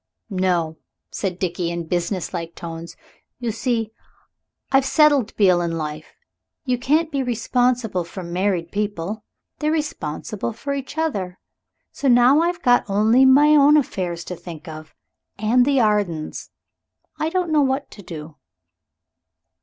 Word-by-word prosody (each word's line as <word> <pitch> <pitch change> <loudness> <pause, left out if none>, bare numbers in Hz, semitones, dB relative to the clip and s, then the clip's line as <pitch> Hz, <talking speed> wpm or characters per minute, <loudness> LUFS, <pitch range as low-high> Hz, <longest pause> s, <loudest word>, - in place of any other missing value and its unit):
"No," 175 -4 0 0.3
said 185 -3 -3
Dickie, 175 -2 -2
in 170 -1 -4
businesslike 170 -1 -3
tones; 165 0 -8 0.4
"you 240 -2 -2
see, 225 -1 -1 0.8
I've 270 0 +4
settled 275 -3 +3
Beale 185 -4 +4
in 165 -1 -2
life. 155 0 -6 0.5
You 250 -1 0
can't 310 +6 +1
be 280 -2 0
responsible 245 -4 0
for 180 +2 -8
married 175 0 -1
people. 205 0 -3 0.4
They're 305 0 0
responsible 230 - -3
for 280 +6 -4
each 275 +2 -6
other. 200 - -2 0.5
So 280 - -3
now 245 +3 +6
I've 345 0 -1
got 245 0 +4
only 220 +6 +4
my 280 +3 +6
own 300 0 +6
affairs 180 - -2
to 180 - -6
think 170 -1 -10
of. 155 0 -10 0.4
And 230 +4 +3
the 275 -1 +3
Ardens. 205 -8 0 0.7
I 310 - 0
don't 360 -1 -1
know 305 -1 +4
what 270 +1 -1
to 205 - -11
do." 155 -4 -9
210 Hz, 140 wpm, -22 LUFS, 175-270 Hz, 0.8 s, now